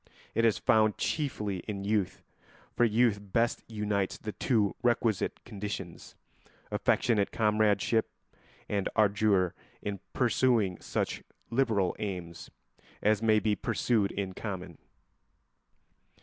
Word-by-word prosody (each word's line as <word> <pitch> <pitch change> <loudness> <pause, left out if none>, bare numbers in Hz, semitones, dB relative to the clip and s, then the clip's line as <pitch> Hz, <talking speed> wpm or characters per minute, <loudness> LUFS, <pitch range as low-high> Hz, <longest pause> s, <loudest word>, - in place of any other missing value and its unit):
It 115 - +2
is 115 - +3
found 110 -1 +3
chiefly 105 -10 -1
in 100 -2 -4
youth, 100 -2 -1 0.5
for 120 - +4
youth 115 -1 +3
best 115 +4 0
unites 105 -3 -1
the 110 - -5
two 105 -6 +1
requisite 115 -4 +1
conditions—affectionate 100 +2 -3
comradeship 110 0 +2 0.6
and 100 -2 -1
ardour 100 -3 +3 0.3
in 100 -1 -3
pursuing 120 -6 +2
such - - -2 0.3
liberal 115 -7 +1
aims 90 -5 -5 0.5
as 105 0 +3
may 110 -1 +4
be 105 0 +1
pursued 105 0 +1
in 95 -2 -3
common. 90 -5 -6
105 Hz, 105 wpm, -30 LUFS, 100-115 Hz, 0.6 s, for